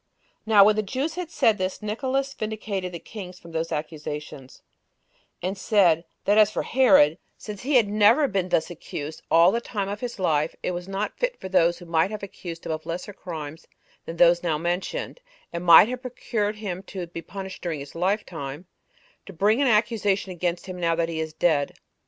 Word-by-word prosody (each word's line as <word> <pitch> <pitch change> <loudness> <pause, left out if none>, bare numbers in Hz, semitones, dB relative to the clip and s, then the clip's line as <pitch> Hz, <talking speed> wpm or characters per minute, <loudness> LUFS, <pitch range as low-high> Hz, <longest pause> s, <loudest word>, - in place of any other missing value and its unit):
3. 220 - -2
Now 200 - +10
when 210 +1 +5
the 215 - +1
Jews 265 +10 -3
had 355 -1 -5
said 225 - +2
this, 185 +2 -3
Nicolaus 265 +6 -1
vindicated 210 -5 -4
the 170 - -5
kings 180 +1 -9
from 170 - -14
those 165 0 -2
accusations, 150 -3 -6 0.8
and 185 +2 -1
said, 190 -5 +3 0.2
that 205 +2 +4
as 215 -1 +6
for - - -3
Herod, 180 - +5 0.2
since 210 -2 -8
he 275 +3 0
had 235 -5 +5
never 210 +8 +4
been 190 -5 -1
thus 165 0 +1
accused 155 -2 -7
all 170 +2 +6
the 235 - -1
time 205 -4 -3
of 205 +1 -4
his 245 0 -5
life, 155 -5 +1
it - - -1
was 175 0 -5
not 195 +2 -3
fit - - -1
for 190 - -7
those 170 -2 +3
that 175 - -12
might 165 +2 +2
have 215 -1 -6
accused 170 -4 -8
him - - -3
of 155 0 -5
lesser 180 +4 -5
crimes 160 -4 -8 0.4
than 165 - -6
those 175 0 +5
now 165 -3 0
mentioned, 175 - -3 0.3
and 170 +1 -4
might 170 +3 +9
have 250 +1 -4
procured 230 -4 -2
him 195 -4 -5
to 190 -2 -6
be 170 0 -8
punished 190 +2 -8
during 165 -4 -3
his 140 0 -9
lifetime, 170 -5 -3 0.6
to - - -8
bring 210 - +2
an 280 - +3
accusation 210 -4 +1
against 175 0 -2
him 185 -1 -7
now 165 -1 +1
he 165 -1 -4
is 160 0 -3
dead. 155 -2 +1
185 Hz, 200 wpm, -25 LUFS, 165-215 Hz, 0.8 s, Now